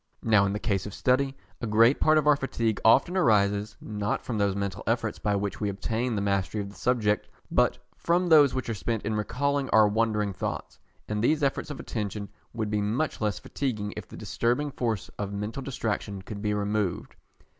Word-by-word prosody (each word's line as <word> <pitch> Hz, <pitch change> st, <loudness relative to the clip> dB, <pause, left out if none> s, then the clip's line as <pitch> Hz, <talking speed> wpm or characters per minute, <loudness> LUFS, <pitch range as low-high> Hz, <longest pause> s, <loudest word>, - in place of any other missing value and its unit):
Now 105 Hz, -3 st, +4 dB
in 100 Hz, -, -1 dB
the -, -, -1 dB
case 100 Hz, -2 st, -1 dB
of 105 Hz, -, -8 dB
study, 135 Hz, +1 st, +1 dB, 0.2 s
a 115 Hz, -, -2 dB
great 115 Hz, +5 st, +5 dB
part 155 Hz, 0 st, +4 dB
of 155 Hz, -, +2 dB
our 150 Hz, -1 st, +6 dB
fatigue 115 Hz, -6 st, -1 dB
often 140 Hz, +10 st, +5 dB
arises, 105 Hz, -, +2 dB
not 105 Hz, -1 st, -3 dB
from 115 Hz, -4 st, -3 dB
those 100 Hz, -1 st, +1 dB
mental 100 Hz, -1 st, -3 dB
efforts 115 Hz, -1 st, 0 dB
by 105 Hz, -1 st, 0 dB
which 100 Hz, +1 st, -3 dB
we 105 Hz, -, 0 dB
obtain 110 Hz, +4 st, -2 dB
the 100 Hz, -, -1 dB
mastery 100 Hz, +1 st, 0 dB
of 100 Hz, -1 st, -4 dB
the -, -, -16 dB
subject, 110 Hz, -4 st, +1 dB, 0.2 s
but -, -, +3 dB, 0.2 s
from 175 Hz, +2 st, +1 dB
those 150 Hz, -6 st, +6 dB
which 130 Hz, -, -2 dB
are 115 Hz, -, -1 dB
spent 110 Hz, +1 st, -2 dB
in 110 Hz, -, -1 dB
recalling 135 Hz, +6 st, -1 dB
our 110 Hz, -1 st, +6 dB
wandering 105 Hz, -1 st, 0 dB
thoughts; -, -, -5 dB, 0.3 s
and 105 Hz, 0 st, -2 dB
these 150 Hz, +4 st, +2 dB
efforts 135 Hz, +2 st, 0 dB
of 145 Hz, -, -6 dB
attention 105 Hz, -2 st, -4 dB, 0.2 s
would 110 Hz, -3 st, -3 dB
be 105 Hz, -1 st, +1 dB
much 115 Hz, +9 st, -1 dB
less 105 Hz, -4 st, 0 dB
fatiguing 105 Hz, -1 st, -3 dB
if 105 Hz, -4 st, -7 dB
the -, -, -11 dB
disturbing 120 Hz, +8 st, -1 dB
force 115 Hz, -7 st, -2 dB
of 100 Hz, -1 st, -3 dB
mental 105 Hz, +6 st, -4 dB
distraction 105 Hz, -7 st, -3 dB
could 100 Hz, 0 st, -7 dB
be 105 Hz, -1 st, 0 dB
removed. 105 Hz, -2 st, -2 dB
110 Hz, 200 wpm, -27 LUFS, 105-125 Hz, 0.3 s, our